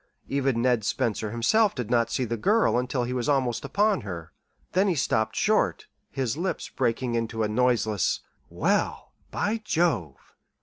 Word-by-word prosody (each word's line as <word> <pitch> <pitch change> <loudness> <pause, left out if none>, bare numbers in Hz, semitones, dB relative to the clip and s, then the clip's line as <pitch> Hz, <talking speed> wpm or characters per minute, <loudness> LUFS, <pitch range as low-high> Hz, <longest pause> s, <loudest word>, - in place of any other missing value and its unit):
Even 135 -4 0
Ned 125 -3 +2
Spencer 110 +1 -1
himself 190 - +2
did 120 -4 -4
not 115 -1 +3
see 125 +2 -1
the 115 0 -2
girl 210 - +2
until 125 0 -1
he 125 +1 -3
was 125 +1 -1
almost 130 -5 +1
upon 200 +8 +1
her. 85 -5 -7 0.4
Then 190 +3 +2
he 185 - +1
stopped 110 -5 0
short, - - +1 0.2
his 130 -5 -2
lips 185 +3 -3
breaking 120 0 -1
into 115 -1 -1
a - - +1
noiseless 110 -4 +1 0.3
"Well, - - -1 0.2
by 215 +2 -1
Jove!" 160 - 0
125 Hz, 160 wpm, -26 LUFS, 115-145 Hz, 0.4 s, not